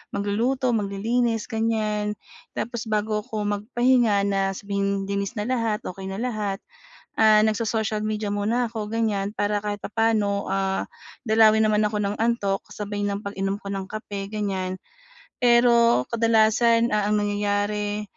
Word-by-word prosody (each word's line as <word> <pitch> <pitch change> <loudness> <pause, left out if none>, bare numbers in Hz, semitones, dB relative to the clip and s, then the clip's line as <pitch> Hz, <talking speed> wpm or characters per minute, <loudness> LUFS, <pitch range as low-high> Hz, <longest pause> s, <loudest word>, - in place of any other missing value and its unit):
magluluto, 235 +6 0
maglilinis, 225 +2 -1
ganyan. 215 -2 -1 0.4
Tapos 235 -1 -4
bago 215 0 0
ako 215 -1 -4
magpahinga 215 +1 +2
na 195 -1 0
sabihing 200 0 -2
linis 200 +2 -3
na 210 - -2
lahat, 230 -3 -1
okey 190 +1 -6
na 190 - -5
lahat, 210 -3 -3 0.5
ah, 215 -1 +6
nagso-social 220 0 0
media 215 0 -2
muna 230 +4 0
'ko, 220 -2 -5
ganyan, 210 -3 0
para 205 -1 -1
kahit 205 0 -3
papaano, 210 -2 0
ah, 195 0 0 0.4
dalawin 220 -1 +5
naman 210 0 +3
ako 210 0 -2
ng 200 +1 -1
antok, 220 -4 +1 0.2
sabay 205 0 -4
ng 200 +1 -3
pag-inom 195 -1 -2
ko 200 - -5
ng 195 -1 -4
kape, 205 -2 -6
ganyan. 195 -3 -3 0.6
Pero 235 - +5
kadalasan, 230 +1 +3
ah, 210 -1 +1
ang 210 0 +1
nangyayari, 205 0 -1
210 Hz, 140 wpm, -24 LUFS, 200-225 Hz, 0.6 s, ah